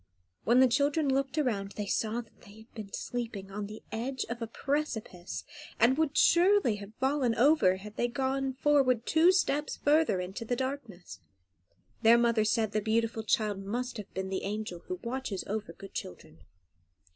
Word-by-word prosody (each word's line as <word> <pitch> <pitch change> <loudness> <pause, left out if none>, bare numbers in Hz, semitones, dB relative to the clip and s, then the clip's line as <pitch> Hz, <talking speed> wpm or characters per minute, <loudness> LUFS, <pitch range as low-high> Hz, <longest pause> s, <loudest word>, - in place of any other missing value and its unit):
When 245 +3 +5
the 260 - +7
children 285 +4 +1
looked 275 +2 -1
around 205 -9 -1
they 210 - -4
saw 220 +3 -1 0.2
they 205 +1 -15
had 220 - -20
been 210 -3 -8
sleeping 225 -6 -5
on 205 +1 -4
the 215 +1 -10
edge 250 +4 -3
of 235 0 -5
a 230 - -2
precipice, 230 -9 -3 0.4
and 240 +4 +5
would 305 -1 0
surely 355 - +4
have 205 +1 -11
fallen 265 -3 +1
over 260 -7 +5
if 205 +3 -9
they - - 0
had 240 - -4
gone 270 0 0
forward 265 -4 +2
two 330 +3 +5
steps 300 -6 0
further 300 - +3
in 180 +1 -4
the 230 +4 -3
darkness. 250 -8 -5 0.8
Their 230 +1 +7
mother 235 -2 +2
said 215 0 +1
the 215 - 0
beautiful 225 +1 0
child 215 -2 0
must 240 +6 -4
have 205 -2 -8
been 190 0 -3
the 190 - -2
angel 210 -3 -4
who 365 -1 -4
watches 235 -5 -3
over 215 +1 -4
good 195 - -12
children. 80 -2 -8
235 Hz, 175 wpm, -30 LUFS, 210-270 Hz, 0.8 s, the